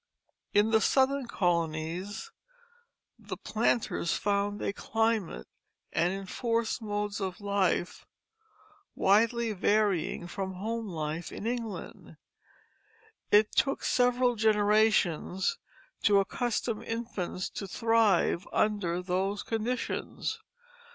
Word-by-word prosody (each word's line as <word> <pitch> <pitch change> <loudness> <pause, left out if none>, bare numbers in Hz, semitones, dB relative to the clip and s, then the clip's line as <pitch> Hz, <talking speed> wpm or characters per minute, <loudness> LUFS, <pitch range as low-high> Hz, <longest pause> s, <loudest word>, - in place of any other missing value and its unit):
In 210 +2 +3
the 220 -1 +4
southern 270 +1 +2
colonies 175 - -1 0.9
the - - -7
planters 225 -5 0
found 205 0 0
a - - -2
climate 225 - -1 0.5
and 170 +2 +2
enforced 230 +5 -2
modes 205 -1 -3
of 190 -2 -3
life 200 -3 0 0.9
widely 230 +3 +3
varying 200 -4 +1
from 190 +1 -4
home 225 +4 -3
life 160 -1 -4
in - - -7
England; 230 -2 -5 1.1
it 210 +1 +5
took 275 - +1
several 245 0 +3
generations 210 - +2 0.4
to 200 -2 +5
accustom 230 +2 -1
infants 220 -6 -4
to 195 - -5
thrive 220 -4 +2
under 185 -5 0
those 190 +3 -1
conditions. 245 - -3
205 Hz, 95 wpm, -29 LUFS, 185-230 Hz, 1.1 s, it